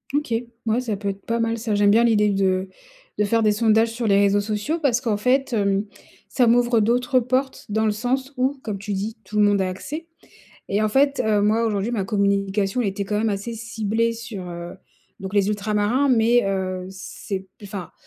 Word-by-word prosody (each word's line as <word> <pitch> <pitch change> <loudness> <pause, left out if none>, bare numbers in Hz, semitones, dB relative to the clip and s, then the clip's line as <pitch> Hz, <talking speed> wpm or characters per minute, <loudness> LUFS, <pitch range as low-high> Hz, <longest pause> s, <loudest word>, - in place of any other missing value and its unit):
OK. 290 -5 -1 0.3
Mouais, 225 +2 +1
ça 225 -5 -3
peut 200 0 -3
être 195 0 -7
pas 230 0 -1
mal 230 0 0
ça. 220 -2 -2
J'aime 205 0 +4
bien 230 +3 +5
l'idée 210 -3 +3
de 190 -1 0 0.5
de 210 - +2
faire 225 +2 +2
des 215 - +4
sondages 225 +1 +3
sur 230 0 -3
les 200 -1 +4
réseaux 200 0 +3
sociaux 215 +10 -2
parce 255 -6 +1
qu'en 225 -5 0
fait, 260 +5 +1
hem, 200 -2 +1 0.4
ça 250 -3 +2
m'ouvre 240 0 +4
d'autres 245 +4 +2
portes, 255 +2 -1
dans 220 +1 0
le 215 - +2
sens 255 +5 -2
où 260 +3 0
comme 210 -3 -4
tu 205 +1 -4
dis 210 +4 -3
tout 210 - -5
le 210 - +5
monde 205 -1 +3
a 190 - 0
accès 295 - -6 0.6
et 205 +2 +1
en 215 - +2
fait, 275 +4 +2
heu, 215 -1 +2
moi 215 +3 +2
aujourd'hui 215 +1 -1
ma 220 -5 0
communication 200 +1 0
elle 225 - +1
était 195 +1 -3
quand 210 +2 -2
même 225 +1 +1
assez 205 +3 -3
ciblée 225 0 -1
sur, 220 -5 -7
heu, 175 +1 -7 0.5
donc 190 +1 -6
les 200 -2 +3
ultra-marins 210 +6 +1
mais, 240 -1 +4
heu, 185 -1 -3
c'est, 190 0 -6 0.2
enfin, 195 -3 -7
215 Hz, 210 wpm, -22 LUFS, 200-235 Hz, 0.6 s, bien